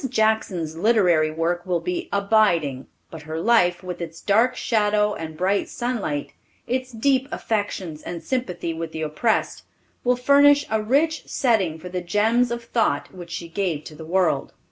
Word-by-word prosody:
Jackson's 215 Hz, -9 st, 0 dB
literary 175 Hz, -5 st, +3 dB
work 165 Hz, +2 st, -1 dB
will 180 Hz, -2 st, 0 dB
be 360 Hz, -1 st, -4 dB
abiding, 200 Hz, -10 st, +2 dB, 0.2 s
but 160 Hz, -, -8 dB
her 160 Hz, +1 st, -5 dB
life, 180 Hz, -4 st, +3 dB
with 180 Hz, -1 st, -6 dB
its 165 Hz, -1 st, -6 dB
dark 230 Hz, +5 st, +2 dB
shadow 210 Hz, -3 st, +1 dB
and 160 Hz, -3 st, -7 dB
bright 195 Hz, +3 st, 0 dB
sunlight, 225 Hz, -, -3 dB, 0.3 s
its 255 Hz, +1 st, -2 dB
deep 260 Hz, +3 st, +1 dB
affections 195 Hz, -7 st, -3 dB
and 170 Hz, -1 st, -6 dB
sympathy 190 Hz, -10 st, -2 dB
with 165 Hz, 0 st, -6 dB
the 160 Hz, -, -3 dB
oppressed, 155 Hz, +9 st, 0 dB, 0.4 s
will 250 Hz, 0 st, +3 dB
furnish 285 Hz, +3 st, +5 dB
a 220 Hz, 0 st, +1 dB
rich 290 Hz, +9 st, +1 dB
setting 210 Hz, -, +1 dB
for 180 Hz, +3 st, -9 dB
the 180 Hz, 0 st, -3 dB
gems 220 Hz, +7 st, +2 dB
of 235 Hz, 0 st, -4 dB
thought 225 Hz, -12 st, 0 dB
which 175 Hz, -2 st, -10 dB
she 170 Hz, 0 st, -5 dB
gave 165 Hz, -3 st, -2 dB
to -, -, -10 dB
the 150 Hz, -, -10 dB
world. 180 Hz, +1 st, 0 dB
200 Hz, 165 wpm, -23 LUFS, 165-235 Hz, 0.4 s, furnish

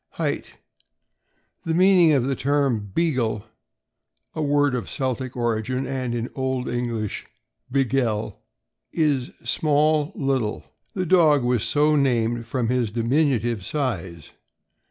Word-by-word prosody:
Height. -, -, -3 dB, 0.5 s
— -, -, -46 dB
The 165 Hz, -1 st, -1 dB
meaning 180 Hz, -2 st, +5 dB
of 135 Hz, -4 st, +3 dB
the 135 Hz, +1 st, -1 dB
term 135 Hz, -6 st, 0 dB
"Beagle" 120 Hz, -, 0 dB, 0.9 s
(a 155 Hz, -, -3 dB
word 145 Hz, -2 st, +2 dB
of 120 Hz, -6 st, -3 dB
Celtic 130 Hz, -1 st, -3 dB
origin, 120 Hz, +2 st, -1 dB
and 130 Hz, -2 st, -3 dB
in 120 Hz, 0 st, -2 dB
old 130 Hz, -1 st, -2 dB
English 120 Hz, -3 st, -3 dB, 0.4 s
Begele), 125 Hz, -5 st, 0 dB, 0.5 s
is 145 Hz, -6 st, +1 dB
small, 150 Hz, 0 st, +2 dB
little. 135 Hz, -6 st, -1 dB, 0.3 s
The 185 Hz, -2 st, -1 dB
dog 155 Hz, -6 st, +4 dB
was 120 Hz, -2 st, +1 dB
so 150 Hz, +1 st, +2 dB
named 120 Hz, -4 st, +1 dB
from 115 Hz, -1 st, -1 dB
his 125 Hz, -3 st, +1 dB
diminutive 120 Hz, -2 st, 0 dB
size. 95 Hz, -, -4 dB
130 Hz, 120 wpm, -23 LUFS, 115-145 Hz, 0.9 s, meaning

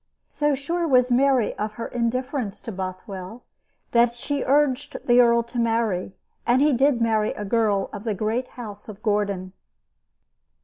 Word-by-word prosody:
So 295 Hz, -1 st, +1 dB
sure 335 Hz, +5 st, -2 dB
was 250 Hz, -3 st, +4 dB
Mary 255 Hz, -2 st, +3 dB
of 210 Hz, 0 st, -2 dB
her 230 Hz, +2 st, -5 dB
indifference 250 Hz, -1 st, -2 dB
to 230 Hz, -, -6 dB
Bothwell 190 Hz, +3 st, -7 dB, 0.5 s
that 235 Hz, 0 st, +3 dB
she 280 Hz, +3 st, -3 dB
urged 285 Hz, 0 st, +1 dB
the 245 Hz, 0 st, +6 dB
earl 235 Hz, -1 st, +4 dB
to 235 Hz, +1 st, -5 dB
marry, 225 Hz, -5 st, 0 dB, 0.3 s
and 240 Hz, +2 st, +3 dB
he 295 Hz, +1 st, +4 dB
did 265 Hz, 0 st, +3 dB
marry 220 Hz, -2 st, +1 dB
a 210 Hz, -, -6 dB
girl 205 Hz, -2 st, +1 dB
of 205 Hz, -1 st, -6 dB
the 220 Hz, -3 st, -1 dB
great 225 Hz, +5 st, -1 dB
house 210 Hz, -3 st, -8 dB
of 215 Hz, 0 st, -10 dB
Gordon. 200 Hz, -4 st, -1 dB
235 Hz, 160 wpm, -24 LUFS, 210-255 Hz, 0.5 s, the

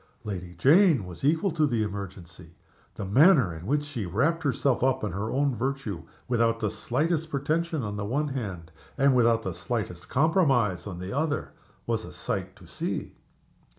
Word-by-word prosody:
Lady 90 Hz, -4 st, -6 dB
Jane 150 Hz, -, +5 dB
was 90 Hz, +3 st, -10 dB
equal 160 Hz, +7 st, +2 dB
to 155 Hz, -2 st, +2 dB
the 115 Hz, -5 st, 0 dB
emergency. 95 Hz, -4 st, -7 dB, 0.4 s
The 100 Hz, -, -5 dB
manner 130 Hz, -, +5 dB
in 80 Hz, +3 st, -8 dB
which 145 Hz, +3 st, +1 dB
she 130 Hz, -9 st, -5 dB
wrapped 140 Hz, -, +1 dB
herself 135 Hz, -3 st, +1 dB
up 130 Hz, -1 st, +2 dB
in 105 Hz, -, -1 dB
her 100 Hz, +5 st, -3 dB
own 140 Hz, 0 st, +1 dB
virtue, 120 Hz, -7 st, -3 dB, 0.3 s
without 115 Hz, -2 st, +2 dB
the 105 Hz, -3 st, -1 dB
slightest 160 Hz, +5 st, -1 dB
pretension 155 Hz, +1 st, -1 dB
on 105 Hz, -1 st, -4 dB
the 100 Hz, -, -3 dB
one 145 Hz, +7 st, -1 dB
hand, 95 Hz, -11 st, -5 dB, 0.3 s
and 135 Hz, -1 st, +4 dB
without 115 Hz, -2 st, +3 dB
the 95 Hz, -, -3 dB
slightest 90 Hz, -2 st, -4 dB
compromise 135 Hz, -, +2 dB
on 90 Hz, -3 st, -6 dB
the 90 Hz, +6 st, -5 dB
other, 150 Hz, 0 st, -1 dB, 0.3 s
was -, -, -1 dB
a -, -, -9 dB
sight -, -, -4 dB
to -, -, -16 dB
see. -, -, -4 dB
120 Hz, 175 wpm, -27 LUFS, 100-145 Hz, 0.4 s, Jane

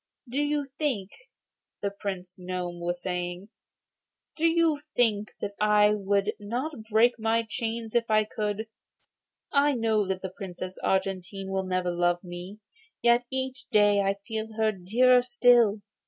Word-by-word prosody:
'Do 265 Hz, +4 st, -1 dB
you 295 Hz, -1 st, 0 dB
think,' 235 Hz, -11 st, -1 dB, 0.7 s
the 200 Hz, -, 0 dB
Prince 190 Hz, -3 st, -6 dB
Gnome 180 Hz, -1 st, -4 dB
was 175 Hz, +1 st, -2 dB
saying, 180 Hz, +1 st, -4 dB, 0.9 s
'do 330 Hz, +1 st, +2 dB
you 330 Hz, -3 st, +2 dB
think 215 Hz, -4 st, +2 dB
that 200 Hz, -, -3 dB
I 210 Hz, 0 st, +5 dB
would 200 Hz, 0 st, 0 dB
not 245 Hz, +9 st, -3 dB, 0.2 s
break 235 Hz, +2 st, +4 dB
my 225 Hz, +1 st, +1 dB
chains 225 Hz, 0 st, -4 dB
if 235 Hz, -1 st, +1 dB
I 215 Hz, 0 st, +4 dB
could? 210 Hz, 0 st, -3 dB, 0.8 s
I 285 Hz, 0 st, +4 dB
know 220 Hz, -3 st, +1 dB
that 190 Hz, 0 st, -3 dB
the 185 Hz, -1 st, -5 dB
Princess 185 Hz, -1 st, -7 dB
Argentine 190 Hz, 0 st, -2 dB
will 190 Hz, -1 st, -1 dB
never 185 Hz, -1 st, 0 dB
love 175 Hz, +1 st, +1 dB
me, 180 Hz, +3 st, -8 dB, 0.5 s
yet 240 Hz, 0 st, +4 dB
each 260 Hz, -1 st, -3 dB
day 205 Hz, -3 st, +4 dB
I 195 Hz, 0 st, +1 dB
feel 220 Hz, -1 st, -4 dB
her 220 Hz, 0 st, +2 dB
dearer 240 Hz, +7 st, +4 dB
still. 240 Hz, -4 st, +4 dB
210 Hz, 145 wpm, -27 LUFS, 190-235 Hz, 0.9 s, I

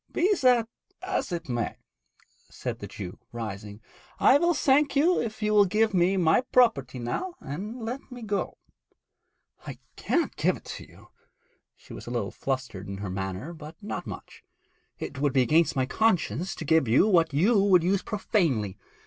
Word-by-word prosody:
'Be 375 Hz, +5 st, +2 dB
that 245 Hz, -3 st, +4 dB, 0.4 s
as 375 Hz, -, -2 dB
it 170 Hz, -1 st, -4 dB
may,' 120 Hz, -2 st, -2 dB, 0.7 s
said -, -, -5 dB
the -, -, -7 dB
Jew, 95 Hz, -3 st, -8 dB
rising, 105 Hz, -2 st, -7 dB, 0.4 s
'I 275 Hz, -, +6 dB
will 345 Hz, +2 st, +3 dB
thank 280 Hz, +1 st, +3 dB
you 330 Hz, +6 st, +3 dB
if 220 Hz, -1 st, -5 dB
you 210 Hz, 0 st, +1 dB
will 205 Hz, -1 st, +6 dB
give 215 Hz, +3 st, +1 dB
me 185 Hz, +1 st, +3 dB
my 170 Hz, +4 st, +4 dB
property 180 Hz, -, +3 dB
now 235 Hz, -, -4 dB
and 210 Hz, -, -6 dB
let 255 Hz, +4 st, -6 dB
me 245 Hz, -1 st, -8 dB
go.' 205 Hz, -2 st, -2 dB, 1.1 s
'I -, -, -6 dB, 0.2 s
cannot -, -, 0 dB
give -, -, +1 dB
it -, -, -19 dB
to -, -, -8 dB
you.' -, -, -18 dB, 0.7 s
She -, -, -14 dB
was -, -, -9 dB
a -, -, -4 dB
little 115 Hz, -5 st, -2 dB
flustered 130 Hz, -8 st, -4 dB
in 100 Hz, 0 st, -6 dB
her 100 Hz, -1 st, -5 dB
manner, 95 Hz, -, -4 dB
but 155 Hz, -1 st, -10 dB
not 210 Hz, 0 st, -6 dB
much. -, -, -9 dB, 0.5 s
'It -, -, -6 dB
would 145 Hz, -2 st, +1 dB
be 130 Hz, -2 st, +4 dB
against 155 Hz, +7 st, +3 dB
my 130 Hz, -1 st, +1 dB
conscience 180 Hz, -, 0 dB
to 160 Hz, -, -7 dB
give 160 Hz, -3 st, +3 dB
you 120 Hz, -, +4 dB
what 170 Hz, -6 st, +3 dB
you 195 Hz, +10 st, +3 dB
would 185 Hz, -4 st, +5 dB
use 190 Hz, +2 st, +1 dB
profanely. 145 Hz, -, -1 dB
170 Hz, 175 wpm, -27 LUFS, -, 1.1 s, I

